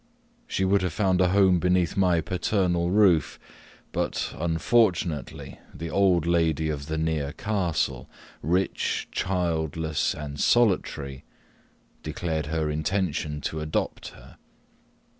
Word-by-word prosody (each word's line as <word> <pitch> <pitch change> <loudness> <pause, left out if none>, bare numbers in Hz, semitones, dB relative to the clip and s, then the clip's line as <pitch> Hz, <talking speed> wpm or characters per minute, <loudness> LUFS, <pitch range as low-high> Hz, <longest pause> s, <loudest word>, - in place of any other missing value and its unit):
She 95 - 0
would 100 +1 +3
have 90 -4 -2
found 95 -3 +2
a 90 - +4
home 95 -1 +4
beneath 90 -1 +1
my 90 -4 +3
paternal 90 0 0
roof, 90 -7 +3 0.5
but, - - -2
unfortunately, 85 - 0 0.2
the 85 +1 -6
old 90 -2 +3
lady 80 -2 +1
of 70 -1 -5
the 80 0 -2
near 80 -3 -1
castle, 85 - -2 0.3
rich, 90 +6 0
childless, 80 -4 -1
and 75 -1 -7
solitary, 75 - +1 0.8
declared 80 -1 -3
her 80 0 -1
intention 75 -1 -1
to 80 - -3
adopt 75 0 -3
her. - - -14
85 Hz, 115 wpm, -26 LUFS, 75-95 Hz, 0.8 s, a